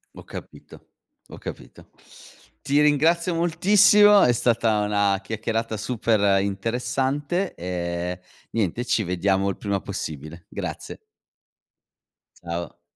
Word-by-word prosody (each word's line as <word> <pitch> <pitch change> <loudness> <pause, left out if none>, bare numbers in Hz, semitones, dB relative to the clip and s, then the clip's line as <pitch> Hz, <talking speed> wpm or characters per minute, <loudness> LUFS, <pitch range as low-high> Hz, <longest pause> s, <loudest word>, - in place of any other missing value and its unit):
Ho - - -11
capito, - - -12 0.4
ho - - -10
capito. - - -10 0.7
Ti 145 +1 +2
ringrazio 165 +4 +3
moltissimo. 205 +4 +5
È 125 - +5
stata 115 -2 +1
una 100 -1 +1
chiacchierata 110 +1 -3
super 105 -3 +1
interessante, 130 - -2
ehm, 90 0 -4 0.3
niente 115 +1 -1
ci 120 -2 +1
vediamo 95 +2 0
il 95 - -3
prima 100 -2 -2
possibile, 80 +2 -7
grazie. - - -6 1.4
Ciao. 85 0 -6
110 Hz, 100 wpm, -24 LUFS, 95-145 Hz, 1.4 s, moltissimo